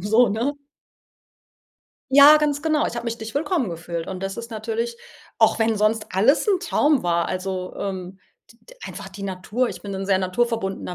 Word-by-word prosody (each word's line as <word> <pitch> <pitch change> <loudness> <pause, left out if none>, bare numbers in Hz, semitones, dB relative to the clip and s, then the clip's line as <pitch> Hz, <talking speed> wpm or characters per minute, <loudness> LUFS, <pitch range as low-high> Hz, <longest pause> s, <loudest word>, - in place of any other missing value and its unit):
So, 220 +6 +4
ne? 235 +8 -1 1.6
Ja, 285 +3 +9
ganz 295 -1 0
genau. 310 -1 +1
Ich - - -5
habe 235 - -4
mich 235 -1 -3
nicht 220 0 -8
willkommen 290 - 0
gefühlt 170 0 -5
und 190 -1 -6
das 195 0 -4
ist 235 +1 -7
natürlich 230 +1 -3 0.4
auch 220 0 +4
wenn 225 -1 +2
sonst 215 +1 +1
alles 220 - +3
'n 390 -4 +2
Traum 295 -5 +2
war, 170 -1 +1
also, 185 0 -4
ähm, 190 -1 -5 0.3
d 230 - -28
d - - -17
einfach 200 -2 -8
die 200 +1 -10
Natur. 200 +6 -2
Ich - - -9
bin 200 -1 -6
'n 195 0 -4
sehr 195 -1 +3
naturverbundener 195 -1 -2
220 Hz, 185 wpm, -23 LUFS, 190-245 Hz, 1.6 s, Ja